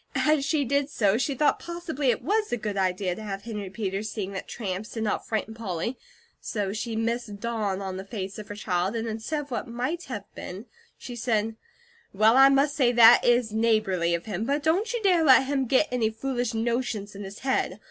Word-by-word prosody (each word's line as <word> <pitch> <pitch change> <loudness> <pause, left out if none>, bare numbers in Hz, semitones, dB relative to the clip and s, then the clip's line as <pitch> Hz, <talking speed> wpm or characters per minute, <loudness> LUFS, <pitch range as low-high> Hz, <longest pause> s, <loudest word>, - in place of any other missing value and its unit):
As 305 -2 +3
she 285 0 +1
did 280 +2 +1
so, 210 -5 +2
she 275 +1 0
thought 295 +3 +2
possibly 340 -6 -3
it - - 0
was 425 +1 0
a 245 - +1
good 210 -2 -4
idea 185 -1 0
to 220 - -8
have 200 -2 -5
Henry 210 -4 -5
Peters 195 +1 -3
seeing 200 -3 -4
that 190 - -6
tramps 200 -1 -4
did 225 - -3
not 210 - -2
frighten 220 0 -2
Polly, 220 +1 -3 0.4
so 200 -3 -3
she 220 +1 -3
missed 225 -2 -2
dawn 210 -4 -2
on 190 -1 -4
the 190 - -5
face 195 -1 -6
of 210 - -8
her 205 - -7
child, 185 0 -1
and 230 0 -2
instead 225 +8 -3
of 285 -2 -12
what 240 +1 -3
might 255 +9 -3
have 210 -6 -5
been, 190 +6 -8 0.3
she 245 - -8
said: 225 -2 0 0.6
"Well, 215 +4 +5
I 270 +1 +8
must 275 +1 +3
say 250 -4 +3
THAT 235 0 +8
is 240 -2 +3
neighbourly 215 -7 +2
of 170 - -6
him; 210 -1 -3
but 285 +3 0
don't 370 +9 +1
you 475 -2 -3
dare 360 -4 +4
let 265 -3 +7
him 270 -1 0
get 270 +5 +3
any 235 -3 +1
foolish 245 +1 -2
notions 230 -3 -2
in 200 +1 -7
his 195 +1 -8
head. 265 +1 0
225 Hz, 215 wpm, -26 LUFS, 205-265 Hz, 0.6 s, I